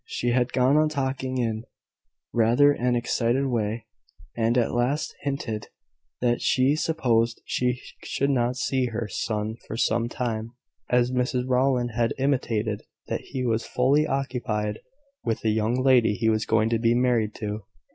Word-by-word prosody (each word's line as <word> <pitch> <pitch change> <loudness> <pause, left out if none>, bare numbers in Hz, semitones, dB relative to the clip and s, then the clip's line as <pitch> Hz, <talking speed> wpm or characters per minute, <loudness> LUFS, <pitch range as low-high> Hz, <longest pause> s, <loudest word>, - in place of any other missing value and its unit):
She 120 - -2
had 125 0 +1
gone 130 +3 +3
on 155 0 +3
talking 130 -3 -2
in 115 -2 -1 0.7
rather 120 +5 +5
an 125 -3 0
excited 120 +2 +1
way, 115 -3 -1 0.5
and 115 +1 +1
at 120 - +1
last 125 +5 0
hinted 135 -6 -3 0.5
that 120 -1 +1
she 130 +3 +3
supposed 120 -8 +1
she 125 0 0 0.2
should 140 +1 0
not 125 -1 +1
see 130 0 0
her 115 -1 -3
son 110 +2 -3
for 110 - -5
some 115 0 +1
time, 115 -2 -3 0.4
as 125 0 +3
Mrs 125 0 0
Rowland 125 -1 +2
had 115 0 0
intimated 115 -6 0 0.3
that - - -2
he 130 -1 -4
was 115 -1 0
fully 140 +5 +2
occupied 120 -6 -2 0.4
with 115 -2 -1
the 110 - +1
young 110 +2 +1
lady 125 -5 +4
he 110 +2 +1
was 110 -1 0
going 110 0 +3
to 115 -1 +1
be 115 +1 +3
married 120 -4 +1
to. 105 -1 -5
120 Hz, 155 wpm, -25 LUFS, 115-130 Hz, 0.7 s, rather